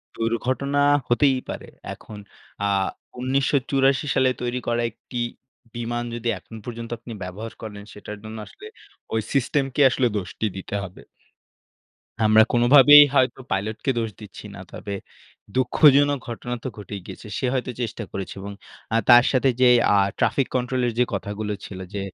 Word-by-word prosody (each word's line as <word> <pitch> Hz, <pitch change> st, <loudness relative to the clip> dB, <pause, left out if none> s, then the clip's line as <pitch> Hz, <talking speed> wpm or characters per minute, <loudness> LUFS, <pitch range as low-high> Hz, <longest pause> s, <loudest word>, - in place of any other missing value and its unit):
দুর্ঘটনা 130 Hz, +5 st, -1 dB, 0.3 s
হতেই 130 Hz, +2 st, +3 dB
পারে। -, -, -6 dB, 0.3 s
এখন 105 Hz, -, -12 dB, 0.5 s
আ -, -, +1 dB, 0.5 s
১৯৮৪ 135 Hz, +1 st, +1 dB
সালে 130 Hz, -1 st, +4 dB
তৈরি 125 Hz, +1 st, -2 dB
করা 120 Hz, 0 st, +1 dB
একটি 120 Hz, +3 st, -10 dB, 0.6 s
বিমান 120 Hz, 0 st, -3 dB
যদি 120 Hz, 0 st, -5 dB
এখন 115 Hz, -, -13 dB
পর্যন্ত 115 Hz, -1 st, -6 dB
আপনি 115 Hz, 0 st, -9 dB
ব্যবহার 100 Hz, +5 st, -7 dB
করেন 105 Hz, -2 st, -8 dB
সেটার 105 Hz, +1 st, -9 dB
জন্য 110 Hz, +1 st, -8 dB
আসলে 425 Hz, -, -12 dB, 0.5 s
ওই 110 Hz, -, +1 dB
সিস্টেমকে 135 Hz, +1 st, 0 dB
আসলে 125 Hz, 0 st, +1 dB
দোষটি 100 Hz, +3 st, -4 dB
দিতে 95 Hz, -, -6 dB
হবে। 95 Hz, -1 st, -10 dB, 1.2 s
আমরা 110 Hz, +1 st, +7 dB
কোনোভাবেই 140 Hz, +4 st, +8 dB
হয়তো 130 Hz, -1 st, +2 dB
পাইলটকে 110 Hz, +6 st, -1 dB
দোষ 115 Hz, -1 st, -1 dB
দিচ্ছি 105 Hz, 0 st, -11 dB
না। -, -, -9 dB
তবে 100 Hz, -, -6 dB, 0.6 s
দুঃখজনক 140 Hz, +2 st, +4 dB
ঘটনা 120 Hz, +1 st, -5 dB
তো -, -, -3 dB
ঘটেই 105 Hz, -1 st, -7 dB
গিয়েছে। -, -, -10 dB
সে -, -, -1 dB
হয়তো 130 Hz, -1 st, -2 dB
চেষ্টা 115 Hz, -1 st, -4 dB
করেছে। 95 Hz, -1 st, -5 dB
এবং 100 Hz, +1 st, -7 dB, 0.4 s
আ -, -, +2 dB
তার 120 Hz, 0 st, +9 dB
সাথে 130 Hz, 0 st, +3 dB
যেই 125 Hz, -1 st, +7 dB, 0.2 s
আ -, -, +5 dB, 0.2 s
ট্রাফিক 135 Hz, -, +2 dB
কন্ট্রোল 125 Hz, 0 st, 0 dB
এর 120 Hz, -, -2 dB
যে -, -, +6 dB
কথাগুলো 105 Hz, +1 st, -3 dB
ছিল 95 Hz, -, -8 dB
যে, 100 Hz, -, -3 dB
120 Hz, 150 wpm, -23 LUFS, 110-130 Hz, 1.2 s, তার